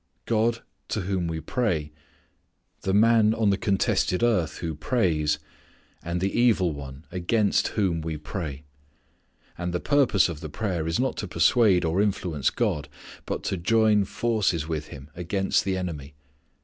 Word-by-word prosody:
God 115 +1 +1 0.2
to 105 - -2
whom 90 -1 -1
we 80 -1 -3
pray, 80 - -1 0.9
the 95 - -1
man 110 +1 +4
on 110 -3 +2
the - - +3
contested 100 0 +1
earth 90 -10 +1
who 80 -2 -3
prays, 80 - +1 0.6
and 85 +1 -3
the 95 +5 -1
evil 105 -9 +3
one 70 +1 -9
against 100 +4 +1
whom 90 -6 +1
we 80 -1 -4
pray. 75 -2 -6 1.0
And 90 0 -3
the - - 0
purpose 135 -8 +3
of 85 -4 -6
the 80 -2 -7
prayer 90 -2 -2
is 80 - 0
not 130 +1 0
to 105 - -3
persuade 90 +2 +3
or 85 +4 +1
influence 90 -8 0
God, 75 0 -1 0.4
but - - -3
to 95 - -2
join 110 +2 +3
forces 100 -9 0
with 80 -2 -3
Him 70 +1 -11
against 95 +3 0
the 95 -1 0
enemy. 75 -6 -5
90 Hz, 155 wpm, -26 LUFS, 80-105 Hz, 1.0 s, man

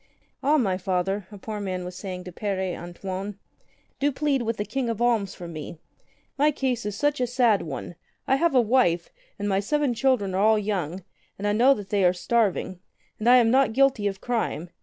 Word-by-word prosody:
"Ah, 295 +3 +3
my 190 -9 +1
Father,'' 190 +1 -1
a 205 - -9
poor 210 +2 -6
man 185 -3 -3
was 180 0 -7
saying 185 -1 -6
to 180 - -8
Pere 190 -1 -2
An 175 +1 -8
toine, 195 +2 -5 0.6
"do 285 +1 +2
plead 280 -1 0
with 230 -2 -2
the 205 - -2
King 265 -1 -2
of 230 -2 -3
Alms 230 -5 +1
for 175 - -8
me. 155 0 -7 0.6
My 295 +2 +5
case 255 -6 -1
is 205 - -4
such 290 +3 0
a 250 - +1
sad 240 -4 +3
one. 155 +2 -6 0.3
I 270 - +3
have 335 -2 +1
a 250 - +7
wife, 210 -8 +2 0.3
and 205 - -3
my 195 -1 +2
seven 290 +5 0
children 235 -6 +1
are 190 - +1
all 220 +1 +5
young, 190 -4 -2 0.3
and 200 - -5
I 205 - +2
know 255 +6 +5
they 200 -1 -1
are 180 0 +5
starving. 190 -2 0 0.4
And 225 +3 +2
I 250 - +8
am 235 -2 +5
not 260 -3 +3
guilty 265 -5 +3
of 195 -1 -4
crime. 220 -8 -2
210 Hz, 210 wpm, -25 LUFS, 185-250 Hz, 0.6 s, I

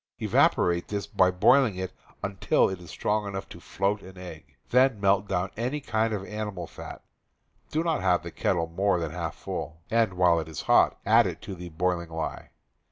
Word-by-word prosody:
Evaporate 85 0 +2
this 100 -3 -3
by 90 +2 +3
boiling 100 0 +3 0.4
until 100 -1 +2
it 95 -1 -5
is 85 - -12
strong 105 0 -1
enough 95 -1 -5
to - - -10
float 100 +2 -1
an 95 0 -13
egg. 80 -5 -11 0.2
Then 125 -3 +4
melt 100 0 +2
down 90 -1 -1
any 125 +6 -2
kind 115 -5 0
of 100 -3 -3
animal 105 -4 -5
fat - - -10 0.7
(do 160 +2 0
not 165 -3 0
have 90 -2 +2
the 85 - -7
kettle 85 -1 0
more 95 +4 +1
than 80 -3 -3
half 85 -1 -4
full), 80 +3 -6
and, 115 -5 +2
while 90 -2 +4
it 80 - -5
is 80 - -6
hot, - - +4
add - - +5
it - - -5
to - - -6
the 90 -1 -8
boiling 85 +1 -1
lye. 80 -1 -5
95 Hz, 190 wpm, -27 LUFS, 85-105 Hz, 0.7 s, add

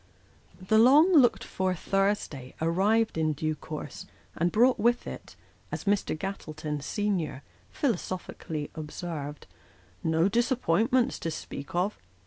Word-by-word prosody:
The 200 +4 +3
long 295 +10 +7
looked 265 -7 +5
for 185 -1 -1
Thursday 195 -9 -1
arrived 195 +5 +2
in 155 -1 +2
due 155 +2 -1
course, 155 0 -7 0.3
and 170 +1 +1
brought 245 +4 +4
with 240 +2 +2
it, - - -8 0.4
as - - -4
Mr. 200 -5 0
Gattleton, 155 -5 -4
senior, 170 -6 -2 0.3
philosophically, 180 - -3
observed, 150 -2 -6 0.3
" 90 - -30 0.2
no 160 +2 +3
dis 235 +5 +1
appointments, 245 +2 +2
to 165 - -2
speak 160 +2 -7
of." 185 +4 0
185 Hz, 125 wpm, -28 LUFS, 155-220 Hz, 0.4 s, long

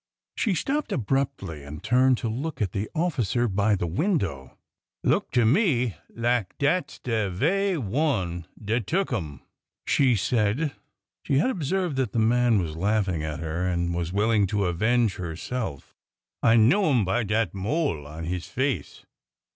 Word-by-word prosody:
She 210 -6 +1
stopped 285 - -1
abruptly 125 - -2
and 75 +1 -9
turned 125 +2 +4
to 120 - -3
look 135 +6 -4
at 100 -6 0
the 100 +2 -3
officer 125 - +1
by 100 +1 +2
the 90 - -2
window. 85 - -1 0.5
Look - - +1
to 120 -2 +4
me 125 - +2
lak 115 -4 -1
dat 165 +6 +1
's - - -12
de 110 -5 -1
ve'y 180 - +1
one 100 - -1
dat 110 +1 -2
tuk 185 -4 0
'em," 75 - -4 0.4
she 130 -4 +3
said. 115 +7 +1 0.5
She 135 - 0
had 255 - +3
observed 175 - -1
that 130 -6 -1
the - - -2
man 120 +1 +3
was 80 -4 -3
laughing 95 -2 0
at 75 -1 -4
her, 80 +3 -2
and 85 -1 0
was 85 0 -2
willing 105 +1 +2
to 100 +1 0
avenge 110 +4 +1
herself. 90 - -5 0.5
I 115 - +5
know 145 - +4
'im 120 -8 +3
by 105 +7 +1
dat 110 -3 0
mole 100 - -1
on 80 +3 -7
his 90 +1 -3
face." 130 0 -2
110 Hz, 160 wpm, -26 LUFS, 90-135 Hz, 0.5 s, I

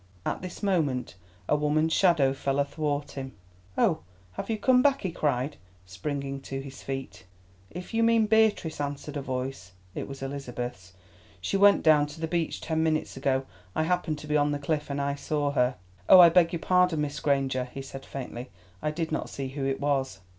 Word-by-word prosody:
At - - -2
this 185 +3 -8
moment 155 -10 0 0.3
a - - +3
woman's 155 +2 +1
shadow 160 -8 +4
fell 135 0 -1
athwart 145 0 -1
him. 135 -1 -6 0.4
"Oh, - - +3 0.3
have 90 - -6
you 225 - 0
come 250 +3 +4
back?" 275 0 +3
he 185 - -1
cried, 145 -3 -1 0.3
springing 135 +9 -4
to 135 0 -5
his 135 0 -9
feet. 135 -7 -6 0.4
"If 180 +5 -8
you 225 - +2
mean 230 -1 +4
Beatrice," 215 -8 +2
answered 145 +1 -4
a 145 - -2
voice—it 110 -9 -6
was 135 -1 -8
Elizabeth's—"she 100 - -7
went 200 +1 +6
down 150 -2 +5
to 150 +2 -11
the 160 - -2
beach 170 -1 -1
ten 160 0 -1
minutes 155 -1 0
ago. 135 0 0 0.3
I - - +2
happened 165 -2 0
to 150 - -9
be 150 - 0
on 145 0 +3
the 145 - 0
cliff, 145 +1 -2
and 140 0 -2
I 140 0 0
saw 145 0 -1
her." 125 -2 +2 0.3
"Oh, 185 - +10
I 175 -1 +10
beg 170 0 +4
your 170 - -3
pardon, 180 -4 +3
Miss 150 -1 -3
Granger," 135 -3 +1
he 135 - -6
said 135 0 -9
faintly. 125 -2 -7 0.3
"I - - 0
did 160 +1 -3
not 155 - -2
see 135 -1 -5
who 135 0 -4
it 135 0 -1
was." 135 -4 0
145 Hz, 190 wpm, -28 LUFS, 135-160 Hz, 0.4 s, Oh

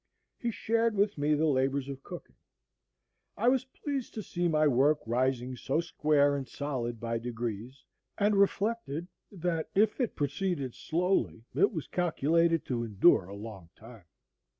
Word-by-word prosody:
He 240 - -1
shared 230 0 0
with 205 +1 +2
me 150 +1 +2
the 155 +2 +1
labors 135 -1 +1
of 135 -1 -7
cooking. - - -10 1.0
I 235 +4 +3
was 260 0 +2
pleased 270 0 -5
to 215 - -4
see 175 -1 -1
my 155 -2 +3
work 145 +3 +4
rising 125 +2 0
so 135 +4 -1
square 150 -4 +2
and 135 -2 -4
solid 125 -5 -3
by 115 0 -2
degrees, 120 +1 -5 0.3
and 205 0 +3
reflected, 200 -5 0 0.2
that, 170 -4 -2
if 210 +5 +3
it 240 - -1
proceeded 145 -2 -2
slowly, 160 - 0
it 185 +9 +3
was 160 -8 -4
calculated 165 -1 +1
to 120 -2 -2
endure 105 - +4
a 100 +2 -9
long 100 -5 -9
time. 110 -4 -14
150 Hz, 150 wpm, -30 LUFS, 125-190 Hz, 1.0 s, work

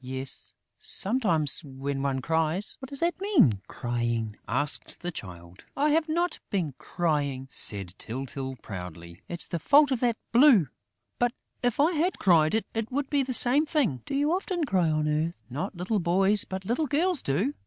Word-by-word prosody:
"Yes, 130 +1 -6 0.2
sometimes, 175 - +1
when 135 0 -4
one 135 -2 -1
cries." 165 +5 -1
"What 265 - -9
does 280 - -6
that 345 +2 0
mean, 240 - +3
crying?" 120 -3 -2
asked 145 +2 -2
the 175 - -3
Child. 90 - -10
"I 295 +2 +2
have 315 +1 +1
not 345 +3 -1
been 170 -8 -1
crying," 145 -6 -2
said 100 -4 +4
Tyltyl 130 +2 -5
proudly. 85 -3 -9
"It's 170 0 -2
the 170 - -4
fault 285 - +5
of 260 - 0
that 235 -2 +1
blue!... 235 - +6 0.5
But, 245 0 +1 0.3
if 245 0 0
I 305 +4 +4
had 345 +3 0
cried, 165 -2 +3
it 225 +1 -3
would 280 +2 -2
be 285 -2 +3
the 260 -1 -3
same 255 +5 +5
thing...." 250 - 0
"Do - - -3
you 290 +3 +1
often 370 -2 -2
cry 185 - +1
on 155 -1 0
earth?..." 155 -3 -2
"Not 180 +10 -4
little 195 +4 -1
boys, 190 +4 +3
but 190 0 -6
little 250 +9 0
girls 325 +3 +1
do.... 190 - 0
180 Hz, 175 wpm, -27 LUFS, -, 0.5 s, blue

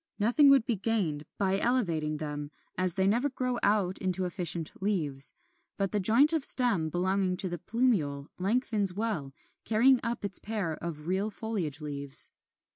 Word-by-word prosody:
Nothing 245 +7 +4
would 275 -4 +5
be 235 - 0
gained 185 -8 -1
by 195 0 +1
elevating 170 -12 0
them, 150 -1 -5 0.3
as 185 -2 +1
they 190 - +1
never 235 +8 +2
grow 250 -2 -2
out 200 -3 +1
into 185 -1 -1
efficient 170 -3 -2
leaves; 155 -9 -1 0.4
but 195 -1 -1
the 210 - 0
joint 235 - +4
of 320 -4 0
stem 230 -13 +4
belonging 185 +2 0
to 185 - -2
the 175 -1 -5
plumule 175 - 0
lengthens 205 -2 +2
well, 205 -11 -2 0.3
carrying 245 +4 +4
up 235 -2 -3
its 195 -2 -1
pair 205 -6 -3
of 155 -3 -6
real 190 +4 -1
foliage 195 -9 -4
leaves. 140 -2 -2
195 Hz, 160 wpm, -29 LUFS, 165-225 Hz, 0.4 s, would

